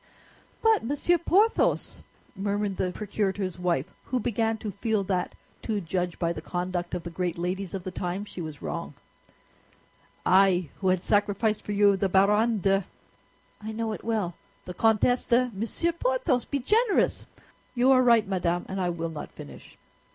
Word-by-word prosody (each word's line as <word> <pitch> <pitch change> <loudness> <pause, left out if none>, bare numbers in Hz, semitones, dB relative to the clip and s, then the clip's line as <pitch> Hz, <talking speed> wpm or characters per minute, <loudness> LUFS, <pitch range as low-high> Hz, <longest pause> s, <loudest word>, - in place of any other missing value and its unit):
"But, 445 -2 +4
Monsieur 290 +7 +1
Porthos," 405 +7 +2 0.3
murmured 200 0 -2
the 180 - 0
procurator's 195 -2 -2
wife, 175 -6 0 0.2
who 255 - -1
began 225 0 0
to 215 -1 -5
feel 210 +1 -1
that, 185 -2 -2 0.3
to 215 -3 -1
judge 175 0 -2
by 170 -1 0
the 155 - -7
conduct 175 +1 -3
of 175 - -4
the 170 - -6
great 175 0 -2
ladies 180 +2 -3
of 190 - -5
the 185 - -5
time, 180 +2 -3
she 185 - -8
was 155 -3 -7
wrong. - - -5 1.3
"I, 185 -3 +4
who 190 - -1
had 185 -1 +2
sacrificed 205 +1 +1
for - - -6
you 200 -1 +5
the 195 0 0
Baronne 210 +4 +3
de—" 195 +1 +2 0.8
"I 215 +1 -5
know 225 0 -2
it - - -8
well." 215 -6 -1 0.3
"The 180 - -6
Comtesse 225 +5 +2
de—" 245 +1 +3
"Monsieur 230 - -1
Porthos, 255 -6 0
be 285 - -2
generous!" 425 - +1 0.5
"You 250 +2 +4
are 255 -1 +6
right, 235 -4 +4
madame, 175 -2 -1
and 190 0 -3
I 180 - +1
will 165 -1 -3
not 155 - -7
finish." - - -12
200 Hz, 165 wpm, -27 LUFS, 180-230 Hz, 1.3 s, are